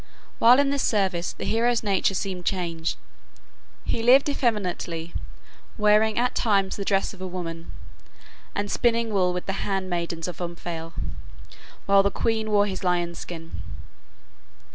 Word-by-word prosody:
While 240 +2 +7
in 280 -1 +3
this 280 -1 0
service 190 -5 +1
the - - -7
hero's 235 +1 +2
nature 195 -1 +1
seemed 185 -2 -3
changed. 170 -3 -1 0.9
He 230 - -1
lived 255 +5 +6
effeminately, 180 - -1 0.6
wearing 210 0 +4
at 245 +1 +2
times 195 -4 +1
the 200 - -4
dress 195 0 +1
of 190 - -13
a 185 - -3
woman, 165 -2 -6 0.8
and 205 0 -2
spinning 230 -2 +1
wool 185 -2 +3
with 180 0 -4
the 195 - -2
hand 190 -2 -2
maidens 170 -1 -2
of 180 -1 -6
Omphale, 170 -1 -5 0.9
while 200 0 +6
the 200 - +2
queen 220 +1 -1
wore 205 -1 +4
his 195 -2 -4
lion's 175 -1 0
skin. 165 -1 -7
195 Hz, 145 wpm, -25 LUFS, 175-220 Hz, 0.9 s, While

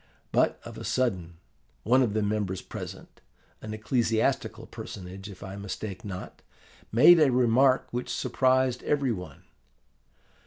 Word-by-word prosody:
But - - +2
of - - -8
a - - -7
sudden, 95 -10 -1 0.5
one 125 +5 +4
of 110 -5 +1
the 110 - +1
members 100 -3 -2
present, - - -9 0.4
an 110 - -7
ecclesiastical 110 +1 0
personage 95 +2 -8
if 100 - -11
I 95 0 -7
mistake 100 -1 -6
not, 95 -3 -7 0.5
made 150 +9 +8
a 150 -4 +5
remark 130 +2 +3
which 125 +1 -4
surprised 130 -1 +1
every 140 -3 +1
one. 90 -5 -7
110 Hz, 130 wpm, -27 LUFS, 100-130 Hz, 0.5 s, made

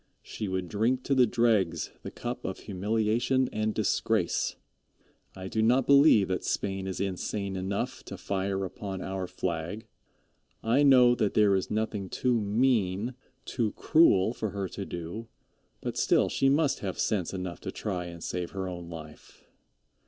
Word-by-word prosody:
She 105 - -5
would 95 -1 -2
drink 115 +7 0
to 140 - 0
the 130 -2 +5
dregs 110 -6 +1
the - - -6
cup - - -5
of - - -5
humiliation 110 +6 0
and 110 0 0
disgrace. 110 -2 0 0.8
I 95 0 -7
do 110 +3 -1
not 125 +4 +3
believe 140 -8 +6
that 95 - -1
Spain 95 -1 -2
is 95 - -4
insane 100 +1 -3
enough 100 +7 -3
to 100 - -7
fire 95 +1 -2
upon 95 -1 -6
our 95 -1 -3
flag. 85 +5 -4 0.8
I 120 +5 +3
know 130 -4 +7
that 105 -4 0
there 105 -2 +5
is 95 -1 0
nothing 105 -3 -2
too 125 +1 +1
mean, 105 0 +1 0.3
too 110 -5 -1
cruel 115 - +4
for 110 -3 -3
her 100 0 -3
to 100 - -6
do, 85 +7 -6 0.5
but - - -4
still - - +3
she 135 - +2
must 140 -1 +2
have 95 -2 -4
sense 95 -6 0
enough 90 -2 -5
to - - -5
try 90 -4 -3
and 85 -1 -9
save 90 -1 -3
her 95 -1 -3
own 85 -2 -7
life. 80 -2 -11
100 Hz, 160 wpm, -28 LUFS, 95-115 Hz, 0.8 s, know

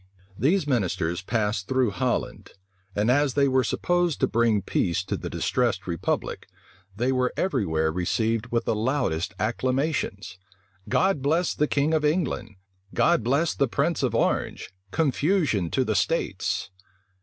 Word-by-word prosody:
These 150 - +2
ministers 95 - 0
passed 105 -1 -1
through 130 -4 +2
Holland; 125 +3 -2 0.4
and 105 +4 +2
as 140 0 +2
they 140 -1 +4
were 130 -1 +3
supposed 175 +5 0
to - - +4
bring 115 -3 +2
peace 85 +1 0
to - - -3
the - - -5
distressed 110 -7 0
republic, 85 -3 -2 0.5
they 120 +5 0
were 125 -1 +1
every 135 - 0
where 80 0 +1
received 110 +7 0
with 120 -1 -1
the - - +1
loudest 105 - -1
acclamations. 125 - -1 0.5
"God 190 -7 +2
bless 160 +5 +1
the 150 - +1
king 145 +3 +1
of 155 -1 +2
England! 150 - -1 0.4
God 120 - +3
bless 140 +8 +1
the 140 - +1
prince - - 0
of - - 0
Orange! - - -1 0.2
Confusion 145 - +1
to - - +1
the - - 0
states!" 95 - -1
125 Hz, 145 wpm, -25 LUFS, 100-145 Hz, 0.5 s, they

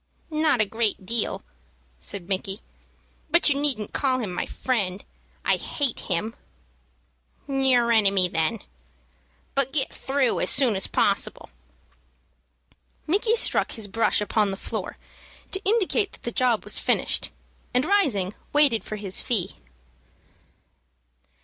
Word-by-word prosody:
"Not 305 -6 +2
a - - +3
great 215 -2 -1
deal," 230 +2 +2 0.6
said 175 - -7
Micky; 195 +1 -2 0.7
"but 340 +1 +4
you 285 - +2
needn't 255 -8 +1
call 265 -2 +1
him 215 -8 -4
my 175 - -3
friend. 205 -7 -2 0.4
I - - +3
hate 280 -5 -1
him." 215 +7 -3 1.1
"Your 265 -4 +2
enemy, 200 -4 +4
then. 165 +6 -1 0.9
But 275 -1 0
get 270 -2 +1
through 270 -2 0
as - - +1
soon 260 -6 +4
as 190 - -1
possible." - - 0 1.5
Micky 415 +7 +2
struck - - +2
his 220 -3 -6
brush 225 +1 +1
upon 210 0 +1
the 195 - -4
floor - - -5 0.5
to 385 - 0
indicate 410 0 +1
that - - -16
the 235 - -3
job 245 -2 +1
was - - +3
finished, - - +1 0.4
and, 250 +3 +1
rising, 260 - +1 0.2
waited 290 -6 +3
for 215 - -6
his 200 -3 +1
fee. 200 -6 -1
235 Hz, 130 wpm, -24 LUFS, 200-280 Hz, 1.5 s, but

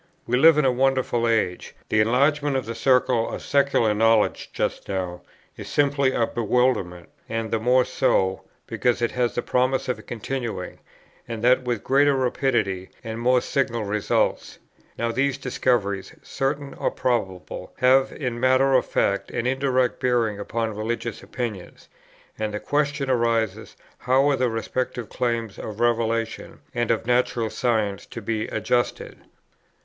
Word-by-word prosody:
We 125 - 0
live 155 +4 +6
in 150 - +3
a 130 - +4
wonderful 130 -2 +1
age; 110 -6 -1
the 110 - +2
enlargement 140 +5 +2
of 130 - -1
the 115 - -4
circle 125 -2 +2
of - - -6
secular 140 -6 +2
knowledge 115 0 +2
just - - -3
now 90 -2 -3 0.4
is - - -8
simply 140 -2 +2
a 115 - +1
bewilderment, 115 -7 0 0.2
and 115 -1 -3
the 115 - +1
more 125 +2 +3
so, 95 0 +1 0.2
because 120 -1 0
it 120 - +1
has 125 -1 -1
the 120 - -1
promise 130 +1 +1
of 125 - -3
continuing, 115 -5 -5 0.5
and 115 -1 -5
that 125 +2 +5
with 120 -3 -3
greater 140 +1 +3
rapidity, 120 -8 0
and 115 -1 -5
more 125 +1 +3
signal 120 -5 -1
results. 105 0 -1 0.4
Now 115 0 -1
these 135 +3 0
discoveries, 115 -7 -1
certain 140 +1 -3
or - - -1
probable, 95 -8 -3
have 130 +1 +4
in 125 -4 -4
matter 130 +2 +3
of 130 - +3
fact 100 0 0
an 120 - -3
indirect 130 -1 +1
bearing 120 -5 +1
upon 110 +2 -2
religious 115 +2 -3
opinions, 110 -8 -6 0.5
and 105 -1 -2
the - - -2
question 145 +1 -1
arises 115 -4 0 0.2
how 130 +2 +3
are - - +2
the 130 -2 +1
respective 120 +1 -3
claims 115 -4 -2
of 105 0 -7
revelation 115 -1 -1
and 120 -1 -1
of 115 -1 0
natural 120 -2 +1
science 110 -5 -1
to - - -7
be 110 -1 -2
adjusted. 120 +2 -1
120 Hz, 150 wpm, -24 LUFS, 110-130 Hz, 0.5 s, live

